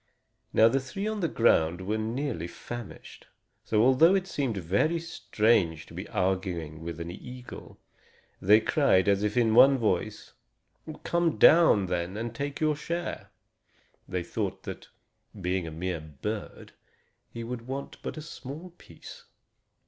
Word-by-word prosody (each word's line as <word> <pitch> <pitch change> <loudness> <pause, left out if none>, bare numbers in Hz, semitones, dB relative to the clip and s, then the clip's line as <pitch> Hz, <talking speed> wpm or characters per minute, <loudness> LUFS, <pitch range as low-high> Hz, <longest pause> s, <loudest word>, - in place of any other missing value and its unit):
Now 110 - +6
the 135 +4 +2
three 135 +10 -5
on 215 -1 -2
the 170 - +1
ground 90 - +2
were 105 +4 -2
nearly 115 - -3
famished. 120 +5 -9 0.4
So, 110 0 +2
although 135 +9 +6
it 190 -2 0
seemed 135 - -2
very 100 - +1
strange 105 - +1
to - - -15
be 95 +4 -6
arguing 90 -6 -2
with 85 0 -6
an 85 +1 -5
eagle, 125 +6 -10 0.6
they 105 +4 +6
cried, 110 -5 +3
as 100 0 +3
if 105 +2 -1
in 115 -2 +3
one 135 +4 +7
voice: 105 -7 -2 0.7
"Come 170 -2 +1
down, 160 - +6
then, 90 +2 -3
and 115 +1 -4
take 140 +4 -4
your 155 -1 +2
share." 170 +3 -4 0.8
They 90 -1 -2
thought - - -4
that, - - -8 0.5
being 90 -1 -1
a - - -6
mere 85 +2 -3
bird, 80 +8 -6 0.6
he 115 - -7
would 120 0 -6
want 135 +1 -5
but - - -6
a 155 - -6
small 155 +4 -9
piece. 485 -1 -13
110 Hz, 150 wpm, -28 LUFS, 90-140 Hz, 0.8 s, one